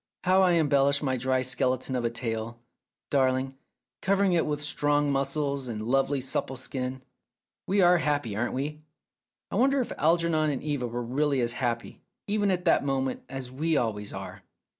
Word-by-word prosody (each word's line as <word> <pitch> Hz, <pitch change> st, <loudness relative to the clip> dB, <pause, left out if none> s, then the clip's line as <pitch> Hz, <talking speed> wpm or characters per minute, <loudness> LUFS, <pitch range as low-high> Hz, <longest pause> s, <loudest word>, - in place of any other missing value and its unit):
"How 185 Hz, +1 st, +4 dB
you 175 Hz, -1 st, +4 dB
embellish 140 Hz, -1 st, +3 dB
my 130 Hz, -2 st, +1 dB
dry 130 Hz, +1 st, 0 dB
skeleton 130 Hz, 0 st, 0 dB
of 125 Hz, -, -1 dB
a 115 Hz, -, +1 dB
tale, 115 Hz, 0 st, -3 dB, 0.5 s
darling, 130 Hz, -1 st, +1 dB, 0.5 s
cover 195 Hz, +1 st, +2 dB
ing 190 Hz, -2 st, +3 dB
it 165 Hz, -2 st, +2 dB
with 150 Hz, -1 st, -1 dB
strong 145 Hz, -1 st, +1 dB
muscles 140 Hz, 0 st, -1 dB
and 115 Hz, -3 st, -4 dB
lovely 135 Hz, +3 st, +2 dB
supple 130 Hz, 0 st, -3 dB
skin. 130 Hz, 0 st, -5 dB, 0.6 s
We 195 Hz, +1 st, +3 dB
are 175 Hz, 0 st, +6 dB
happy, 145 Hz, -9 st, -1 dB
aren't 120 Hz, +3 st, -1 dB
we? 150 Hz, +3 st, -3 dB, 0.7 s
I -, -, -1 dB
wonder 270 Hz, +4 st, +3 dB
if 250 Hz, -, -2 dB
Algernon 165 Hz, -1 st, +2 dB
and 140 Hz, -3 st, -3 dB
Eva 145 Hz, -5 st, -1 dB
were 120 Hz, +1 st, -4 dB
really 140 Hz, +3 st, 0 dB
as 120 Hz, 0 st, +2 dB
happy, 120 Hz, -2 st, -3 dB, 0.2 s
even 205 Hz, 0 st, +1 dB
at 180 Hz, -1 st, 0 dB
that 165 Hz, -, +4 dB
moment, 135 Hz, -2 st, -1 dB
as 130 Hz, -1 st, -6 dB
we 155 Hz, +4 st, 0 dB
always 105 Hz, -4 st, -1 dB
are -, -, -8 dB
135 Hz, 175 wpm, -27 LUFS, 125-155 Hz, 0.7 s, are